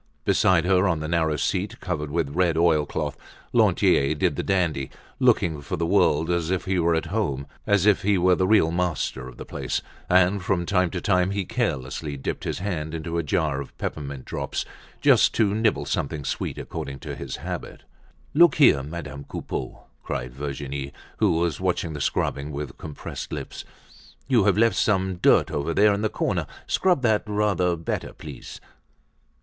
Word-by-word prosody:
Beside 90 -3 +3
her, 95 +1 +3
on 85 -4 +1
the 80 - -4
narrow 80 -2 +1
seat 95 +7 -2
covered 75 -5 -3
with 80 -2 -1
red 85 -1 +2
oil 80 -3 +3
cloth, - - -3 0.4
Lantier 70 +3 +3
did - - +1
the - - -1
dandy, 85 -8 0 0.3
looking 80 -4 +2
for 70 - -4
the 85 - 0
world 80 0 +3
as 85 -2 0
if 95 -1 -1
he 95 -1 0
were 85 0 +3
at 80 - -1
home, 70 -11 -1 0.2
as 105 -2 +3
if 105 -2 +4
he 100 0 +2
were 90 +1 +4
the 95 +1 +2
real 100 -6 +4
master 85 -7 -2
of 65 - -12
the - - -8
place, - - -3 0.3
and 95 +2 +4
from 90 -1 0
time 90 -1 +2
to 90 - -4
time 90 -2 +2
he 100 -1 -2
carelessly 75 - -2
dipped 65 - -4
his - - -2
hand 80 -5 -3
into 85 +1 -3
a - - +2
jar 75 -2 0
of 70 - -11
peppermint 70 -3 -5
drops, - - -3 0.4
just - - +5
to 105 -3 +2
nibble 105 -10 +1
something 70 0 -2
sweet - - -3
according 70 -1 -6
to - - -7
his 65 -2 -6
habit. - - -6 0.5
"Look 170 +3 +6
here, 105 - +6
Madame 75 -1 -7
Coupeau!" 65 - -5 0.2
cried - - -4
Virginie, 70 0 -5 0.2
who - - +3
was 85 -3 0
watching 80 - -1
the 75 - -5
scrubbing 70 +2 -1
with 70 -2 -6
compressed 75 -2 -7
lips, - - -6 0.6
"you 120 -7 +3
have 100 -2 +3
left 115 -3 +3
some 95 -3 +1
dirt - - +4
over 75 +3 -2
there 105 0 +5
in 100 - -2
the 110 - +1
corner. - - -1 0.2
Scrub 180 -8 +2
that 110 -3 +3
rather 105 -4 +1
better 80 -1 -4
please." 70 -5 -10
85 Hz, 180 wpm, -25 LUFS, 75-95 Hz, 0.6 s, Look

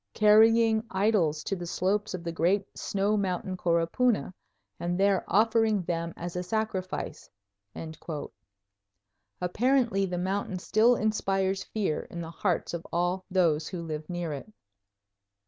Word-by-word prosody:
carrying 220 +1 +5
idols 190 -6 +1
to 195 - -2
the 175 -2 -6
slopes 195 +3 0
of 175 - -7
the 170 - -3
great 185 +5 +1
snow 200 +2 0
mountain 190 -2 -1
Coropuna, 180 +6 +1 0.5
and 175 +1 -2
there 195 -2 +3
offering 220 0 +3
them 170 -1 -2
as 175 +1 -6
a 180 - -1
sacrifice." 190 -1 -3 2.1
Apparently 225 +2 +2
the 180 -1 -3
mountain 190 +1 -2
still 220 +6 +3
inspires 195 -3 0
fear 200 -8 -2
in 170 - -7
the 165 -1 -6
hearts 175 0 -1
of 170 -1 -4
all 175 +2 0
those 165 -5 +2
who 175 -2 -5
live 155 -1 -5
near 175 -3 -3
it. 145 +10 -8
190 Hz, 130 wpm, -28 LUFS, 175-210 Hz, 2.1 s, carrying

